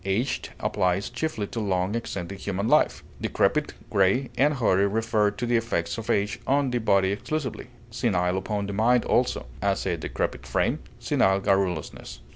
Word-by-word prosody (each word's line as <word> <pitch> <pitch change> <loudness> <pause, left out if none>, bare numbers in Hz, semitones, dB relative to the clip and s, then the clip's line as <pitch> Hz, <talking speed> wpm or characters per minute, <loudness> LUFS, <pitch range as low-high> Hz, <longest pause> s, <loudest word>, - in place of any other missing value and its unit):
Aged 95 +7 -1
applies 90 +4 0
chiefly 120 -3 -2
to 115 +3 -5
long 95 -2 0
extended 100 -5 -4
human 100 +2 -2
life. - - +3 0.2
Decrepit, - - +1 0.2
gray, 100 +7 +2
and 145 +2 +3
hoary 100 -6 +3
refer 110 0 +1
to 105 +4 -4
the 120 0 +2
effects 85 -7 -1
of 110 - -8
age 100 +1 +1
on 140 -1 +2
the 120 - 0
body 100 -4 +3
exclusively; 135 +8 -3 0.2
senile 95 -7 +1
upon 100 +1 -2
the 100 - -4
mind 115 +4 +3
also; - - +1 0.2
as, 100 0 0
a 90 -3 0
decrepit 80 - -3
frame, - - +1 0.2
senile 95 0 +2
garrulousness. 95 -5 -1
100 Hz, 160 wpm, -26 LUFS, 95-120 Hz, 0.2 s, life